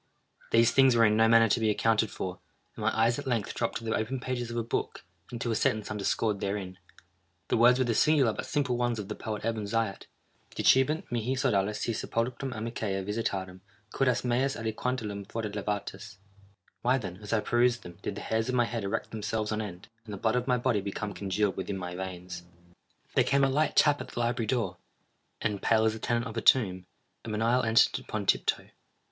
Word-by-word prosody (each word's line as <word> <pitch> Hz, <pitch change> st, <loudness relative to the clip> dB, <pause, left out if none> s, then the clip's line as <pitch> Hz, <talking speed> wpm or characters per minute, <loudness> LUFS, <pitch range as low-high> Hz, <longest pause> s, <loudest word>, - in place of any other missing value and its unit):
These 115 Hz, 0 st, +4 dB
things 135 Hz, 0 st, +5 dB
were 115 Hz, -1 st, +6 dB
in 105 Hz, 0 st, +3 dB
no 110 Hz, +1 st, +5 dB
manner 115 Hz, 0 st, +6 dB
to 115 Hz, -, +2 dB
be 110 Hz, -1 st, +2 dB
accounted 110 Hz, 0 st, +2 dB
for, 90 Hz, -2 st, -5 dB, 0.4 s
and -, -, -8 dB
my -, -, 0 dB
eyes 115 Hz, +3 st, +3 dB
at 140 Hz, -, -7 dB
length 115 Hz, -5 st, -1 dB
dropped 115 Hz, -, -1 dB
to 115 Hz, -, -10 dB
the 110 Hz, -, -1 dB
open 125 Hz, +4 st, -2 dB
pages 125 Hz, -1 st, -3 dB
of 120 Hz, -, -4 dB
a 115 Hz, -, 0 dB
book, 115 Hz, -, -3 dB, 0.2 s
and 120 Hz, -, -6 dB
to 120 Hz, -, -1 dB
a -, -, 0 dB
sentence 110 Hz, -1 st, 0 dB
underscored 105 Hz, 0 st, 0 dB
therein. 95 Hz, -2 st, -4 dB, 0.7 s
The -, -, +2 dB
words 120 Hz, +2 st, +6 dB
were 130 Hz, -, +2 dB
the 120 Hz, -, +1 dB
singular 135 Hz, -1 st, +3 dB
but -, -, -5 dB
simple 140 Hz, -4 st, 0 dB
ones 120 Hz, -1 st, 0 dB
of 105 Hz, -1 st, -6 dB
the 105 Hz, -, -3 dB
poet 110 Hz, -1 st, -5 dB
Ebn 115 Hz, -2 st, -1 dB
Zaiat:—"Dicebant 115 Hz, +6 st, 0 dB
mihi 120 Hz, +2 st, -1 dB
sodales 105 Hz, -6 st, +1 dB
si 115 Hz, -, -1 dB
sepulchrum 120 Hz, +4 st, -2 dB
amicae 110 Hz, -4 st, -3 dB
visitarem, 95 Hz, -3 st, -3 dB, 0.3 s
curas 125 Hz, -2 st, +1 dB
meas 130 Hz, +3 st, +1 dB
aliquantulum 110 Hz, -2 st, -3 dB
fore 115 Hz, -, -3 dB
levatas." 100 Hz, -1 st, -4 dB, 0.6 s
Why 125 Hz, +2 st, +3 dB
then, 95 Hz, -7 st, -6 dB
as 105 Hz, -, -7 dB
I 115 Hz, -, +3 dB
perused 120 Hz, +2 st, +2 dB
them, 85 Hz, -1 st, -11 dB
did -, -, -4 dB
the -, -, -6 dB
hairs 110 Hz, +2 st, -1 dB
of 130 Hz, -, 0 dB
my 120 Hz, -1 st, +3 dB
head 115 Hz, -2 st, -4 dB
erect 100 Hz, +3 st, -3 dB
themselves 110 Hz, 0 st, -2 dB
on 110 Hz, 0 st, -1 dB
end, 90 Hz, -4 st, -8 dB, 0.2 s
and 110 Hz, -, -9 dB
the 100 Hz, -, -5 dB
blood 110 Hz, +4 st, +1 dB
of 125 Hz, +1 st, -1 dB
my 125 Hz, -1 st, +3 dB
body 120 Hz, -4 st, +1 dB
become 100 Hz, +1 st, -4 dB
congealed 100 Hz, 0 st, -1 dB
within 95 Hz, +1 st, -4 dB
my 90 Hz, -1 st, -5 dB
veins? 90 Hz, -1 st, -6 dB, 0.7 s
There -, -, +4 dB
came 140 Hz, +1 st, +2 dB
a 135 Hz, -, +4 dB
light 150 Hz, +4 st, +1 dB
tap 145 Hz, -1 st, +4 dB
at -, -, -7 dB
the -, -, -7 dB
library 120 Hz, -1 st, 0 dB
door—and, 105 Hz, -1 st, -5 dB
pale 110 Hz, -1 st, +3 dB
as 110 Hz, -, +2 dB
the 110 Hz, -, -7 dB
tenant 120 Hz, +1 st, 0 dB
of 115 Hz, -2 st, -7 dB
a -, -, 0 dB
tomb, 95 Hz, -9 st, +3 dB, 0.4 s
a -, -, -7 dB
menial 115 Hz, +4 st, +2 dB
entered 115 Hz, -1 st, +3 dB
upon -, -, -5 dB
tiptoe. -, -, +1 dB
115 Hz, 210 wpm, -29 LUFS, 105-120 Hz, 0.7 s, were